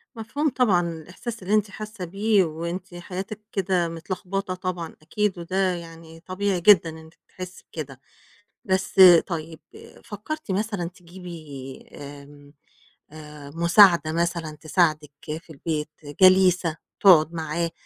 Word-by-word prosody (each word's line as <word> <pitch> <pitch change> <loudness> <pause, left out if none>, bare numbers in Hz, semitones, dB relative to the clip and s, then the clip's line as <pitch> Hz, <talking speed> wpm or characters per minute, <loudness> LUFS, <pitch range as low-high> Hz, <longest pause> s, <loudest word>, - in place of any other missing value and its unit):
مفهوم 280 +7 -2
طبعًا، 215 -10 +2
الإحساس 180 +7 -8
اللي 195 +3 -2
أنتِ 210 -1 +2
حاسّة 215 -2 -7
بيه 200 +3 +2
وأنتِ 170 +3 -5
حياتِك 185 +4 -6
كده 185 -3 0
متلخبطة 185 +3 -4
طبعًا 180 -3 -5
أكيد، 190 +4 -1
وده 185 +2 0
يعني 165 -1 -11
طبيعي 185 +1 -2
جدًا 175 -3 +6
إنِّك 160 0 -12
تحسّي 185 0 -10
بكده، 135 -5 -7 0.6
بس 190 0 0 0.3
طيب 160 -2 -6 0.4
فكّرتِ 230 +7 -7
مثلًا 200 -2 -2
تجيبي 170 -7 -11
آمم 145 0 -12 0.6
آآ 150 -2 -11
مساعدة 170 -1 +5
مثلًا 170 -2 -2
تساعدِك 155 -3 +1 0.3
في 170 - -28
البيت، 155 0 -4 0.3
جليسة 185 -3 +5 0.2
تقعُد 165 -4 +6
معاه 165 +1 -2
175 Hz, 120 wpm, -24 LUFS, 160-190 Hz, 0.6 s, جدًا